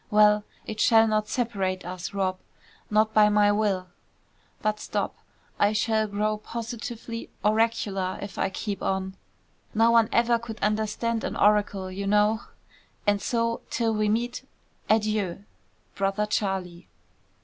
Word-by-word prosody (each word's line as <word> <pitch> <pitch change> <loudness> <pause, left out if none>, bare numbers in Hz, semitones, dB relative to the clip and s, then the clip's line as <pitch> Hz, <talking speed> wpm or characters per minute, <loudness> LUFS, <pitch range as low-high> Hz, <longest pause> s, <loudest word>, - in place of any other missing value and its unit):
Well, 210 0 +5 0.2
it 215 -1 -6
shall 225 0 +5
not 215 -1 +1
separate 195 -6 -2
us, 180 0 -5
Rob.; 190 -2 -1 0.5
not 215 +1 +2
by 210 -1 +6
my 205 0 +4
will. 205 -3 0 0.8
But 215 0 0
stop. - - -2 0.5
I 205 +1 +4
shall 220 0 +1
grow 210 +1 -1
positively 230 +1 -6 0.2
oracular 210 -4 +1
if 200 - -7
I - - +1
keep 200 +1 -4
on, 190 0 -2 0.6
(no 225 +2 +5
one 230 -1 +5
ever 235 0 +3
could 230 -1 -7
understand 220 +2 0
an - - -3
oracle, 205 -2 +2
you 195 +1 -4
know) 210 +2 +3 0.6
and 205 -1 +2
so, 230 +1 0
till 230 -2 0
we 215 -1 +1
meet, 240 +3 -1 0.5
adieu. 215 -4 +1 0.5
"BROTHER 195 +1 0
CHARLIE." 190 -4 -2
210 Hz, 135 wpm, -26 LUFS, 200-225 Hz, 0.8 s, by